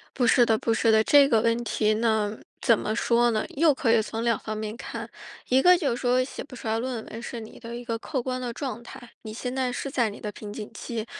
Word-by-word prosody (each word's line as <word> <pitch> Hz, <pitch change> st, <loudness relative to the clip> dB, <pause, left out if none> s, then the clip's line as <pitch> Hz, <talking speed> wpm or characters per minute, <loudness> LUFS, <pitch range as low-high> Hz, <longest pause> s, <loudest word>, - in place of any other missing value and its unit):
不 245 Hz, -3 st, +2 dB
是 240 Hz, +1 st, +5 dB
的 225 Hz, -1 st, +3 dB
不 230 Hz, -, 0 dB
是 225 Hz, 0 st, +3 dB
的， 220 Hz, 0 st, +5 dB
这 285 Hz, +1 st, +6 dB
个 225 Hz, -4 st, +4 dB
问 230 Hz, 0 st, +2 dB
题 215 Hz, -2 st, +1 dB
呢， 215 Hz, -1 st, 0 dB, 0.2 s
怎 230 Hz, -, +4 dB
么 215 Hz, +2 st, -2 dB
说 235 Hz, 0 st, +3 dB
呢？ 215 Hz, -, 0 dB
又 305 Hz, +1 st, +4 dB
可 265 Hz, -5 st, +1 dB
以 230 Hz, -, +4 dB
从 225 Hz, +1 st, -4 dB
两 235 Hz, -1 st, +2 dB
方 215 Hz, -1 st, -5 dB
面 215 Hz, 0 st, -4 dB
看， -, -, -7 dB, 0.4 s
一 260 Hz, +1 st, +4 dB
个 360 Hz, +4 st, +7 dB
就 290 Hz, -7 st, 0 dB
是 -, -, -6 dB
说 250 Hz, 0 st, +3 dB
写 255 Hz, -, -7 dB
不 270 Hz, -, -12 dB
出 230 Hz, -, -8 dB
来 220 Hz, +1 st, +1 dB
论 245 Hz, -2 st, -4 dB
文 225 Hz, +2 st, -8 dB
是 240 Hz, -, -6 dB
你 220 Hz, -1 st, -11 dB
的 230 Hz, +1 st, -7 dB
一 240 Hz, 0 st, -7 dB
个 230 Hz, -2 st, -2 dB
客 260 Hz, +3 st, -3 dB
观 255 Hz, +1 st, -3 dB
的 245 Hz, -1 st, -3 dB
状 245 Hz, -1 st, -5 dB
态， 240 Hz, 0 st, -12 dB
你 215 Hz, -1 st, -8 dB
现 250 Hz, +3 st, -4 dB
在 260 Hz, -1 st, 0 dB
是 260 Hz, +3 st, -4 dB
在 245 Hz, -5 st, +1 dB
你 205 Hz, -, -10 dB
的 210 Hz, -, -5 dB
瓶 210 Hz, -1 st, -9 dB
颈 210 Hz, 0 st, -7 dB
期， 225 Hz, -1 st, -5 dB
235 Hz, 290 characters per minute, -26 LUFS, 220-255 Hz, 0.4 s, 个